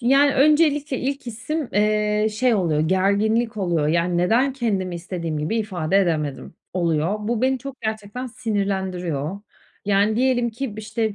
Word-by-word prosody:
Yani, 275 Hz, +3 st, +4 dB
öncelikle 295 Hz, -1 st, +3 dB
ilk 275 Hz, 0 st, -3 dB
hissim, 250 Hz, +6 st, -4 dB
eee, 210 Hz, 0 st, +2 dB
şey 235 Hz, +3 st, +2 dB
oluyor, 165 Hz, -7 st, +1 dB
gerginlik 200 Hz, +7 st, +1 dB
oluyor, 170 Hz, -6 st, 0 dB
yani, 170 Hz, +2 st, +1 dB
neden 235 Hz, +10 st, +2 dB
kendimi 200 Hz, -8 st, -1 dB
istediğim 170 Hz, -2 st, -4 dB
gibi 155 Hz, +10 st, -1 dB
ifade 190 Hz, -4 st, 0 dB
edemedim 155 Hz, -7 st, -1 dB, 0.2 s
oluyor. 170 Hz, +1 st, 0 dB
Bu 225 Hz, +2 st, -2 dB
beni 260 Hz, 0 st, +2 dB
çok 270 Hz, 0 st, -9 dB
gerçekten 220 Hz, +3 st, -4 dB
sinirlendiriyor. 190 Hz, -, -2 dB, 0.4 s
Yani, 205 Hz, +2 st, +2 dB
diyelim 245 Hz, -1 st, +2 dB
ki, 235 Hz, -1 st, -5 dB
işte, 220 Hz, 0 st, -2 dB
210 Hz, 140 wpm, -22 LUFS, 180-245 Hz, 0.4 s, Yani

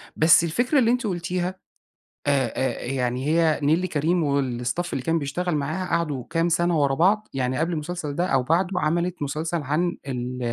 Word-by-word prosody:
بس 160 Hz, +1 st, +6 dB
الفكرة 245 Hz, -, +1 dB
اللي 235 Hz, -1 st, +3 dB
أنتِ 245 Hz, -3 st, 0 dB
قُلتيها 180 Hz, 0 st, -2 dB, 0.7 s
آآ، 135 Hz, -5 st, +2 dB
آآ، 130 Hz, -, -2 dB
يعني 125 Hz, 0 st, -2 dB
هي 160 Hz, 0 st, +2 dB
نيللي 165 Hz, +6 st, +2 dB
كريم 165 Hz, +3 st, +1 dB, 0.2 s
والstaff 125 Hz, +7 st, -2 dB
اللي 130 Hz, -, -2 dB
كان 165 Hz, +2 st, +1 dB
بيشتغل 155 Hz, +4 st, -2 dB
معاها، 155 Hz, +6 st, -2 dB
قعدوا 150 Hz, -6 st, -1 dB
كام 165 Hz, 0 st, +1 dB
سنة 170 Hz, -1 st, +2 dB
ورا 140 Hz, -1 st, +2 dB
بعض، 210 Hz, +6 st, +2 dB
يعني 130 Hz, -1 st, -1 dB
قبل 170 Hz, +2 st, 0 dB
المسلسل 155 Hz, -1 st, -4 dB
ده، 175 Hz, +3 st, +1 dB
أو 135 Hz, -5 st, +1 dB
بعدُه، 180 Hz, +5 st, +1 dB
عَمَلِت 170 Hz, +1 st, -1 dB
مسلسل 155 Hz, +3 st, -2 dB
عن 155 Hz, +5 st, -1 dB
ال 125 Hz, -1 st, -4 dB
165 Hz, 175 wpm, -24 LUFS, 140-175 Hz, 0.7 s, بس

